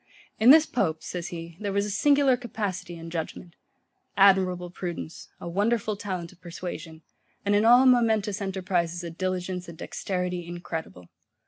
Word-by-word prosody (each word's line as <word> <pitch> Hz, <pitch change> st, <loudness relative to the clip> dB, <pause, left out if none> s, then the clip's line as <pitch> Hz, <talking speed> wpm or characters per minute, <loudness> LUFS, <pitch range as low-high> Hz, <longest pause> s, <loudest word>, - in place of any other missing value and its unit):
In 225 Hz, +3 st, +6 dB
this 310 Hz, +3 st, +9 dB
pope, 165 Hz, -, -1 dB
says 175 Hz, -1 st, -5 dB
he, 165 Hz, -2 st, -8 dB
there 205 Hz, -2 st, -2 dB
was 200 Hz, +1 st, +1 dB
a 210 Hz, -, -3 dB
singular 280 Hz, +4 st, +4 dB
capacity 200 Hz, -7 st, -4 dB
and 165 Hz, 0 st, -9 dB
judgement: 170 Hz, +1 st, -5 dB, 0.6 s
admirable 185 Hz, -3 st, +4 dB
prudence; 175 Hz, -2 st, -6 dB
a -, -, -7 dB
wonderful 210 Hz, +4 st, 0 dB
talent 185 Hz, -4 st, -5 dB
of 185 Hz, -1 st, -22 dB
persuasion; 165 Hz, -2 st, -7 dB, 0.4 s
and 205 Hz, -, +2 dB
in 205 Hz, +2 st, +3 dB
all 245 Hz, +3 st, +7 dB
momentous 220 Hz, -5 st, +3 dB
enterprizes 180 Hz, -3 st, -1 dB
a 170 Hz, -, -5 dB
diligence 180 Hz, 0 st, -3 dB
and 165 Hz, -, -10 dB
dexterity 180 Hz, -1 st, -3 dB
incredible. 165 Hz, -, -6 dB
185 Hz, 150 wpm, -26 LUFS, 170-205 Hz, 0.6 s, this